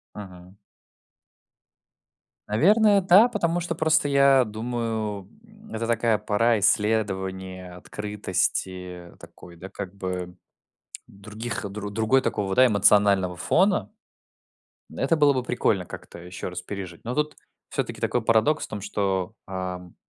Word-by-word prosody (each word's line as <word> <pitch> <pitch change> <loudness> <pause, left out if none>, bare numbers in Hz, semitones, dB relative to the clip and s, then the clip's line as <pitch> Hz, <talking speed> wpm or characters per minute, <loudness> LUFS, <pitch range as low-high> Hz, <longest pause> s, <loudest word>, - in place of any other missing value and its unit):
Мгм. 90 -2 -11 1.9
Наверное, 200 - +4
да, 190 +5 +6
потому 175 -7 -1
что 170 -1 -3
просто 160 -2 +2
я 140 -2 +5
думаю, 110 -3 -4 0.2
м, 215 0 -16
это 115 +1 -3
такая 115 -2 +1
пора 110 +2 +1
исследования, 95 -3 -1
открытости 90 -3 -3
такой, 85 - -14
да, 95 +3 -10
как 100 0 -8
бы 90 -2 -5 0.7
других, 105 +2 -6
дру 105 +1 -6
другой 110 +5 +2
такого, 95 -2 -1
да, 130 - +6
эмоционального 100 -4 +3
фона. 190 - +1 1.0
Это 165 - +1
было 145 -2 +5
бы 130 - -1
прикольно 110 -6 0
как-то 85 - -11
еще 90 +1 -7
раз 90 0 -6
пережить, 95 -4 -8
но 120 +2 -3
тут 150 +1 -1 0.3
всё-таки - - -4
такой 120 - 0
парадокс 115 +8 +2
в - - -9
том, 105 - -6
что, 95 0 -2
ам 90 -1 -6
105 Hz, 125 wpm, -25 LUFS, 95-125 Hz, 1.9 s, да